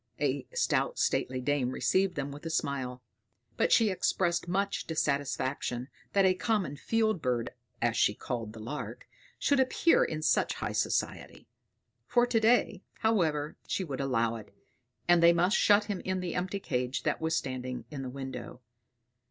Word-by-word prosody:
A -, -, -1 dB
stout -, -, +1 dB
stately 130 Hz, 0 st, 0 dB
dame 135 Hz, -1 st, 0 dB
received 185 Hz, +7 st, +1 dB
them 140 Hz, -1 st, -3 dB
with 145 Hz, +2 st, -10 dB
a -, -, -3 dB
smile; 130 Hz, -5 st, -2 dB, 0.5 s
but -, -, +1 dB
she 225 Hz, -3 st, +5 dB
expressed 175 Hz, -2 st, 0 dB
much 200 Hz, +3 st, -1 dB
dissatisfaction 140 Hz, -4 st, -1 dB, 0.2 s
that 195 Hz, -1 st, +4 dB
a 185 Hz, -, +5 dB
common 190 Hz, -, -1 dB
field 220 Hz, +3 st, 0 dB
bird, 125 Hz, -3 st, -1 dB, 0.3 s
as 120 Hz, -1 st, +2 dB
she 105 Hz, -, +3 dB
called 115 Hz, -3 st, -4 dB
the 110 Hz, -, -10 dB
lark, 150 Hz, -, -6 dB, 0.3 s
should 285 Hz, -1 st, +2 dB
appear 265 Hz, +5 st, +4 dB
in 155 Hz, 0 st, -3 dB
such -, -, +2 dB
high -, -, -3 dB
society. -, -, -2 dB, 0.6 s
For 240 Hz, 0 st, +4 dB
to 240 Hz, -2 st, +2 dB
day, 220 Hz, -3 st, +3 dB, 0.2 s
however, 160 Hz, -9 st, +1 dB
she 190 Hz, -, -1 dB
would 140 Hz, -6 st, -4 dB
allow 115 Hz, -4 st, +1 dB
it; 110 Hz, -, -12 dB, 0.6 s
and 175 Hz, -1 st, +5 dB
they 170 Hz, 0 st, +7 dB
must 175 Hz, +4 st, +2 dB
shut 205 Hz, 0 st, +5 dB
him 205 Hz, -3 st, -3 dB
in 185 Hz, 0 st, -2 dB
the 180 Hz, -2 st, -3 dB
empty 185 Hz, +2 st, -2 dB
cage 125 Hz, -6 st, -2 dB
that -, -, -1 dB
was 160 Hz, 0 st, 0 dB
standing 130 Hz, -3 st, -3 dB
in 145 Hz, -3 st, -5 dB
the 130 Hz, -, -5 dB
window. 130 Hz, -1 st, -7 dB
160 Hz, 165 wpm, -30 LUFS, 130-195 Hz, 0.6 s, they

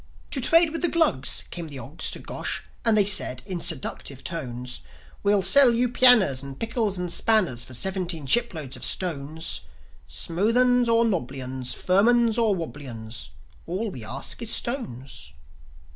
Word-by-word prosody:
To 270 Hz, -, -1 dB
trade 330 Hz, +5 st, +4 dB
with 330 Hz, -, -4 dB
the 350 Hz, -, +3 dB
Glugs 320 Hz, -, +2 dB
came 170 Hz, -2 st, -7 dB
the 145 Hz, -3 st, -10 dB
Ogs 135 Hz, +6 st, -2 dB
to -, -, -4 dB
Gosh, -, -, -4 dB, 0.2 s
And 225 Hz, -2 st, +3 dB
they 205 Hz, -, +6 dB
said 130 Hz, -10 st, +2 dB
in 180 Hz, -3 st, -6 dB
seductive 140 Hz, -4 st, -3 dB
tones, 125 Hz, -7 st, -6 dB, 0.4 s
"We'll 200 Hz, -1 st, +1 dB
sell 255 Hz, +6 st, +8 dB
you 245 Hz, +1 st, +1 dB
pianers 230 Hz, -, +5 dB
and 135 Hz, -1 st, -10 dB
pickels 225 Hz, -4 st, -2 dB
and 180 Hz, -1 st, -4 dB
spanners 180 Hz, -, +1 dB
For 130 Hz, -, -9 dB
seventeen 180 Hz, 0 st, -2 dB
shiploads 160 Hz, -, -1 dB
of -, -, -10 dB
stones: 160 Hz, -, 0 dB, 0.5 s
Smooth 205 Hz, +8 st, -1 dB
'uns 250 Hz, -1 st, +3 dB
or 230 Hz, 0 st, +3 dB
nobbly 140 Hz, -, -3 dB
'uns, 130 Hz, -1 st, -4 dB
Firm 195 Hz, +4 st, +2 dB
'uns 235 Hz, -1 st, +2 dB
or 220 Hz, -4 st, +1 dB
wobbly 150 Hz, -5 st, -8 dB
'uns, 110 Hz, -1 st, -7 dB, 0.4 s
All 195 Hz, +5 st, -4 dB
we 125 Hz, -8 st, -10 dB
ask 130 Hz, -, -5 dB
is 230 Hz, -, -2 dB
stones." 130 Hz, -, -1 dB
180 Hz, 165 wpm, -24 LUFS, -, 0.5 s, sell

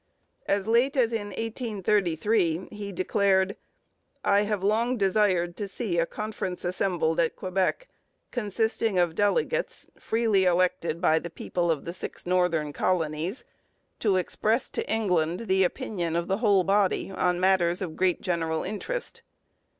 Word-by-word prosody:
As 200 Hz, 0 st, 0 dB
late 245 Hz, +5 st, +3 dB
as 235 Hz, -3 st, +3 dB
in 210 Hz, -2 st, -2 dB
1833 205 Hz, -5 st, 0 dB
he 205 Hz, -1 st, -6 dB
declared: 190 Hz, +1 st, +1 dB, 0.7 s
'I 200 Hz, 0 st, +4 dB
have 210 Hz, -2 st, -1 dB
long 230 Hz, +5 st, +1 dB
desired 190 Hz, -4 st, +2 dB
to 205 Hz, -, -3 dB
see 195 Hz, -4 st, -1 dB
a 170 Hz, -, +1 dB
conference 210 Hz, -4 st, -5 dB
assembled 175 Hz, -3 st, 0 dB
at 165 Hz, -1 st, +1 dB
Quebec, 190 Hz, -, -1 dB, 0.4 s
consisting 220 Hz, -2 st, 0 dB
of 175 Hz, -2 st, +2 dB
delegates 470 Hz, -, 0 dB
freely 220 Hz, -4 st, +2 dB
elected 175 Hz, -2 st, +1 dB
by 160 Hz, -3 st, +4 dB
the 170 Hz, -, -7 dB
people 170 Hz, +1 st, -2 dB
of 160 Hz, -3 st, 0 dB
the 170 Hz, -, -4 dB
six 185 Hz, -, -6 dB
northern 175 Hz, -5 st, +1 dB
colonies, 165 Hz, -, -1 dB, 0.5 s
to 205 Hz, -4 st, +2 dB
express 215 Hz, +6 st, 0 dB
to -, -, -3 dB
England 180 Hz, -6 st, +1 dB
the 190 Hz, -4 st, +2 dB
opinion 180 Hz, -5 st, -2 dB
of 170 Hz, 0 st, -1 dB
the 195 Hz, -, 0 dB
whole 205 Hz, -4 st, +3 dB
body 195 Hz, 0 st, +1 dB
on 180 Hz, -1 st, 0 dB
matters 185 Hz, -2 st, +3 dB
of 170 Hz, -5 st, -5 dB
great 185 Hz, -1 st, +1 dB
general 165 Hz, -3 st, -1 dB
interest.' 470 Hz, -, -4 dB
190 Hz, 140 wpm, -27 LUFS, 175-215 Hz, 0.7 s, I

